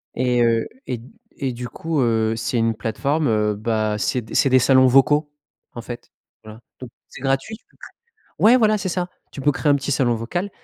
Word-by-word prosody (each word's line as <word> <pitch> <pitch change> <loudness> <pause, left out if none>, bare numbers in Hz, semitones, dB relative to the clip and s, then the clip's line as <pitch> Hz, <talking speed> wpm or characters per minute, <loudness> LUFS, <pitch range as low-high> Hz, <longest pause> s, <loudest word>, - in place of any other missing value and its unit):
Et, 125 -1 +1
heu, 115 -1 +1 0.2
et 125 - -2
d 115 +3 -14 0.3
et 135 -2 -1
du 125 0 -7
coup, 160 +1 -2
heu, 115 -2 +1
c'est 115 +2 -2
une 115 0 +1
plateforme, 140 +8 -1
heu, 105 -1 +1
bah, 110 0 -1
c'est 125 +3 -1
d 110 - -12
c'est 135 - +3
des 130 0 +5
salons 130 +1 +5
vocaux, 145 +3 +3 0.4
en 120 - -7
fait. 120 0 -9 0.3
Voilà 110 +1 -12 0.2
don 125 - -7 0.2
c'est - - -13
gratuit. 135 +11 -1 0.8
Ouais, 230 +4 +6
voilà, 215 -2 +3
c'est 195 -2 -3
ça. 180 0 -2 0.2
Tu 140 - -8
peux 145 +2 +3
créer 145 +2 -1
un - - +4
petit 140 0 -3
salon 130 -3 +2
vocal 175 - -3
125 Hz, 205 wpm, -21 LUFS, 115-145 Hz, 0.8 s, Ouais